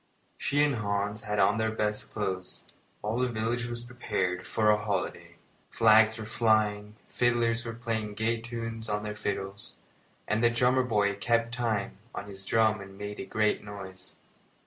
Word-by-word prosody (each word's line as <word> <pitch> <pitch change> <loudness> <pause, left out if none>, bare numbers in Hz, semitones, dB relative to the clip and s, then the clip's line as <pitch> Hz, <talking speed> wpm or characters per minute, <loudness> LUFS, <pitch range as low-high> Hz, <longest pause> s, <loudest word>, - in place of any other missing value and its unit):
She 145 +1 +2
and 145 -4 +2
Hans 100 0 -1
had 105 0 -1
on 105 +2 +4
their 110 0 +2
best 105 -1 -1
clothes, 95 -3 -3
and - - -27 0.3
all 110 +3 -1
the 125 - +2
village 115 +1 -1
was 120 0 -4
prepared 105 -7 -2
for 105 -1 +3
a 105 - +4
holiday. 100 -3 -3 0.3
Flags 110 0 +5
were 110 - -5
flying, 105 -2 +1
fiddlers 120 -1 +1
were 115 - -4
playing 110 -3 -3
gay 115 +2 0
tunes 115 -1 -5
on 105 0 -1
their 105 0 -3
fiddles, 100 -1 -4 0.5
and 110 +2 +1
the 120 - +6
drummer 125 +2 +3
boy 105 -4 +2
kept 115 +2 +1
time 110 -6 -1 0.2
on - - -4
his 95 -1 -9
drum 110 -2 +3
and 95 0 -11
made 105 0 -6
a - - -4
great 110 0 +1
noise. 95 -3 -10
110 Hz, 170 wpm, -29 LUFS, 105-115 Hz, 0.5 s, the